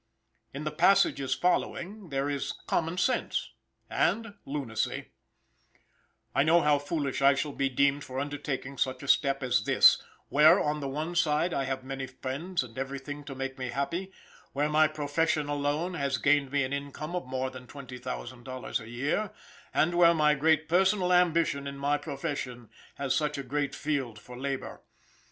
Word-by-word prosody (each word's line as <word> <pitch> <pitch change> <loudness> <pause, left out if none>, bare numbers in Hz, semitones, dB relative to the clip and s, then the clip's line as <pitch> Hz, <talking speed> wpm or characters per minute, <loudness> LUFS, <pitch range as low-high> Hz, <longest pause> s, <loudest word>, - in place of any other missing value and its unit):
In 140 +2 -6
the 150 - -2
passages 165 -4 +3
following 180 +2 -1
there 135 0 -1
is 140 -1 -2
common 165 +1 0
sense 250 +8 0 0.4
and 225 0 0
lunacy: 135 -6 -3 1.2
"I - - +3
know 165 +4 +5
how 150 -1 +3
foolish 145 -2 -2
I 140 0 +6
shall 145 +2 -2
be 135 -1 0
deemed 140 +2 +2
for 130 +1 -5
undertaking 140 -1 -4
such 130 0 -1
a - - -7
step 135 -1 +3
as 125 -1 +1
this, - - +6 0.3
where, 150 +2 +7
on 150 0 0
the 140 - -3
one 155 +5 -3
side, 165 +1 +2
I 135 - 0
have 130 -1 -3
many 135 0 -5
friends 135 +6 -3
and 125 +1 -9
everything 140 +2 -5
to 140 -2 -7
make 135 0 -5
me 130 -1 -3
happy, 170 +9 -2 0.4
where 145 +2 +1
my 155 +1 +5
profession 150 0 0
alone, 145 +5 -1
has 140 -5 -1
gained 145 +1 +2
me 140 -1 +2
an 130 +2 -3
income 140 +4 -5
of 175 -8 -3
more 130 0 -2
than 130 -1 -11
twenty 130 -2 -9
thousand 125 -1 -6
dollars 130 0 -4
a 110 -1 -10
year, 140 - -1 0.4
and 170 +3 +2
where 170 -1 +6
my 150 -1 +4
great 155 +2 +2
personal 185 +2 +3
ambition 165 -5 +2
in 140 0 -6
my 145 +1 +1
profession 140 -6 -5 0.2
has 140 -2 -1
such 150 +1 0
a 140 - -4
great 140 +1 -2
field 135 -7 -2
for 125 +3 -11
labor. 135 +1 -4
145 Hz, 175 wpm, -29 LUFS, 135-155 Hz, 1.2 s, where